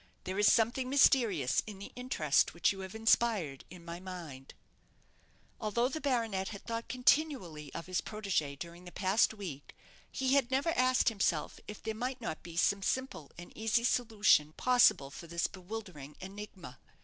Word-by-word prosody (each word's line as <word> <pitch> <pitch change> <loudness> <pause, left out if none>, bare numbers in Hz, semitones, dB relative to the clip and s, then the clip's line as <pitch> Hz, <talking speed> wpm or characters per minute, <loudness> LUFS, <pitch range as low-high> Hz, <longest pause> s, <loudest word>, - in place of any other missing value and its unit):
There 185 +2 -3
is 205 - +6
something 240 +3 +2
mysterious 225 - +4
in 210 -2 -7
the 200 - -9
interest 165 - +1
which 170 - +3
you 195 - -7
have 190 +2 -7
inspired 220 - +1
in 175 -1 -12
my 170 +1 -6
mind." 170 -8 -9 1.0
Although 235 +3 0
the 315 +3 -5
baronet 225 -8 0
had 200 -3 -8
thought 230 0 -4
continually 250 - +1
of 165 - -5
his 185 0 -1
protégée 190 -10 -2
during 170 +3 -9
the 175 - -9
past 195 +4 +2
week, 180 -10 -8 0.4
he 265 0 0
had 275 -4 +3
never 270 +5 +1
asked 255 -6 +3
himself 190 -8 -1
if 210 - -9
there 220 - -2
might 250 +4 -3
not 225 -9 -5
be 170 -1 -10
some 200 +3 +2
simple 260 - -2
and 175 0 -11
easy 225 +1 +1
solution 215 -11 +3
possible 245 - +4
for 170 - -10
this 170 +1 -1
bewildering 185 -7 -7
enigma. 190 -7 -9
200 Hz, 165 wpm, -32 LUFS, 170-235 Hz, 1.0 s, is